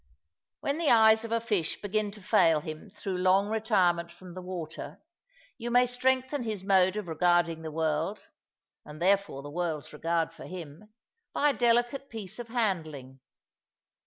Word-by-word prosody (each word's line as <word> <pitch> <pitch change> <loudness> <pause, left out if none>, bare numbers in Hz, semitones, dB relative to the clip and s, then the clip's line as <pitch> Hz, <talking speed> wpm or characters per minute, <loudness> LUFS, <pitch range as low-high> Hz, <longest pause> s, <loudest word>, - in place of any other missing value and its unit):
When 280 +3 -1
the 330 - +2
eyes 220 -1 +6
of 230 - -6
a 230 - +2
fish 210 -8 -1
begin 210 +1 -1
to 210 -2 -12
fail 165 -4 +4
him 155 +5 -8
through 195 -2 -5
long 190 +2 +3
retirement 185 -6 +1
from 180 +1 -12
the 185 - -7
water, 180 -3 -7 0.6
you 240 0 -4
may 245 +1 +5
strengthen 260 +2 0
his 215 -5 -4
mode 190 -1 +4
of 210 -3 -4
regarding 170 0 +2
the 160 - -5
world 160 - -2 0.6
(and 150 +1 -11
therefore 190 -6 +1
the 145 - -8
world's 160 -3 -3
regard 165 +2 -1
for - - -11
him) 175 +3 -9 0.4
by 295 0 +3
a - - -4
delicate 240 +3 +1
piece 215 -1 -6
of 240 - -6
handling. 160 - -2
190 Hz, 160 wpm, -29 LUFS, 165-225 Hz, 0.6 s, eyes